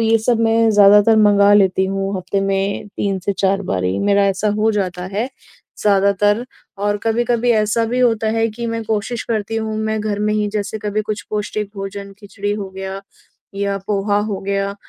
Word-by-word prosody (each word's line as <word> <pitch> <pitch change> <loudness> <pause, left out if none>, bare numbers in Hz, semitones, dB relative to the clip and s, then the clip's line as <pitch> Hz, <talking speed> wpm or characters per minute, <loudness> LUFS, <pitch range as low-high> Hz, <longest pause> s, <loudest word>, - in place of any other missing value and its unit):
ये 225 0 +3
सब 230 +1 +1
मैं 225 0 +3
ज़्यादातर 205 +1 +6
मँगा 205 -1 +5
लेती 190 -2 +3
हूँ 195 0 -2
हफ्ते 195 +2 -2
में 195 +1 -1
3 195 -2 -1
से 200 - +1
4 195 0 +2
बारी। 95 - -1
मेरा 200 0 +2
ऐसा 195 +2 0
हो 220 +1 +2
जाता 185 -3 -2
है 225 +6 -1 0.5
ज़्यादातर 205 +2 +2 0.3
और 205 0 0
कभी-कभी 235 +1 +1
ऐसा 220 0 +2
भी 245 +3 -2
होता 225 -3 +2
है 225 0 +2
कि 235 +2 -6
मैं 230 0 -3
कोशिश 220 +2 -2
करती 225 -1 -2
हूँ 220 -1 -2
मैं 220 0 -1
घर 210 -1 -2
में 210 0 +1
ही 210 -1 0
जैसे 210 +1 -3
कभी 210 +1 -2
कुछ 210 0 -4
पौष्टिक 210 -1 -3
भोजन 200 0 -6
खिचड़ी 205 0 -4
हो 200 -2 -4
गया, 190 0 -6 0.5
या 200 0 -1
पोहा 205 0 0
हो 195 - -3
गया, 200 0 -2
205 Hz, 185 wpm, -18 LUFS, 195-220 Hz, 0.5 s, ज़्यादातर